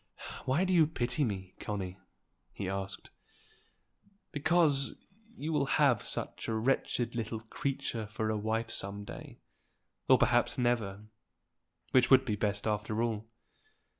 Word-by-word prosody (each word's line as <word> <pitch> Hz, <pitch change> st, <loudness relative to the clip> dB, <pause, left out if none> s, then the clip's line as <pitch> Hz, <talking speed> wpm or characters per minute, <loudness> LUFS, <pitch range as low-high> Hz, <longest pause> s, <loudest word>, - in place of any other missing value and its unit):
"Why 135 Hz, +8 st, +2 dB
do 185 Hz, 0 st, +1 dB
you 165 Hz, -4 st, +6 dB
pity 125 Hz, -1 st, -1 dB
me, 95 Hz, -6 st, -3 dB
Connie?" 95 Hz, -3 st, -4 dB, 0.5 s
he 95 Hz, -, -4 dB
asked. 95 Hz, 0 st, -4 dB, 1.2 s
"Because 150 Hz, -2 st, +3 dB, 0.4 s
you 160 Hz, +2 st, -3 dB
will 140 Hz, -2 st, +2 dB
have 135 Hz, -8 st, +4 dB
such -, -, -2 dB
a 115 Hz, -, 0 dB
wretched 120 Hz, 0 st, 0 dB
little 115 Hz, -1 st, -3 dB
creature 120 Hz, -1 st, -3 dB
for 110 Hz, +1 st, -2 dB
a -, -, 0 dB
wife 110 Hz, +2 st, -1 dB
some 100 Hz, 0 st, -2 dB
day, -, -, -9 dB, 0.7 s
or -, -, +8 dB
perhaps -, -, +3 dB
never, 115 Hz, -5 st, 0 dB, 0.9 s
which 130 Hz, -1 st, +5 dB
would 130 Hz, 0 st, +7 dB
be 110 Hz, -4 st, 0 dB
best 100 Hz, 0 st, -1 dB
after 110 Hz, +1 st, 0 dB
all." 110 Hz, -2 st, -2 dB
115 Hz, 135 wpm, -32 LUFS, 105-135 Hz, 1.2 s, or